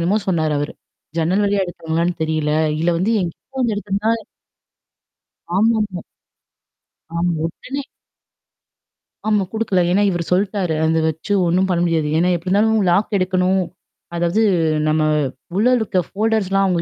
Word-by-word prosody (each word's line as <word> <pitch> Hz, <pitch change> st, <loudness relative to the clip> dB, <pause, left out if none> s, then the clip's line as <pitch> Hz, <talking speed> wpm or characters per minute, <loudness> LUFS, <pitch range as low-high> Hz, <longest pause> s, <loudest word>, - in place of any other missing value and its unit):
என்னமோ 185 Hz, +6 st, +2 dB
சொன்னாரு 160 Hz, -4 st, +1 dB
அவரு. 145 Hz, -, -3 dB, 0.5 s
ஜன்னல் 180 Hz, +5 st, +2 dB
வழியா 200 Hz, -1 st, +1 dB
எடுத்தாங்களான்னு 170 Hz, 0 st, -2 dB
தெரியல. 155 Hz, -1 st, 0 dB, 0.3 s
இதுல 170 Hz, +2 st, +2 dB
வந்து 210 Hz, +6 st, +1 dB
என்கிட்ட 185 Hz, +10 st, -6 dB
வந்து 235 Hz, -4 st, +1 dB
எடுத்துருந்தா 205 Hz, +1 st, -1 dB, 1.5 s
ஆமாமா. 210 Hz, -4 st, +1 dB, 1.1 s
ஆம். 175 Hz, +1 st, +1 dB
உடனே 270 Hz, +11 st, -5 dB, 1.4 s
ஆமா, 210 Hz, -2 st, +2 dB
குடுக்கல. 210 Hz, -5 st, +1 dB
ஏன்னா 200 Hz, +3 st, +3 dB
இவரு 175 Hz, -2 st, -1 dB
சொல்ட்டாரு. 190 Hz, -3 st, +1 dB
அத 160 Hz, 0 st, +2 dB
வச்சு 160 Hz, +6 st, -3 dB
ஒண்ணும் 185 Hz, +3 st, +2 dB
பண்ண 175 Hz, -, +1 dB
முடியாது. 160 Hz, -3 st, +1 dB
ஏன்னா 180 Hz, +2 st, +3 dB
எப்டி 170 Hz, +2 st, -6 dB
இருந்தாலும் 215 Hz, +2 st, +3 dB
லாக் 200 Hz, +4 st, +2 dB
எடுக்கணும். 185 Hz, 0 st, +1 dB, 0.5 s
அதாவது 175 Hz, +5 st, +1 dB, 0.5 s
நம்ம 155 Hz, 0 st, +2 dB, 0.5 s
உள்ள 215 Hz, +5 st, +3 dB
இருக்க 195 Hz, -5 st, 0 dB
ஃபோல்டர்ஸ்லாம் 195 Hz, -2 st, +1 dB
அவுங்க 175 Hz, -3 st, +1 dB
185 Hz, 130 wpm, -20 LUFS, 170-205 Hz, 1.5 s, ஏன்னா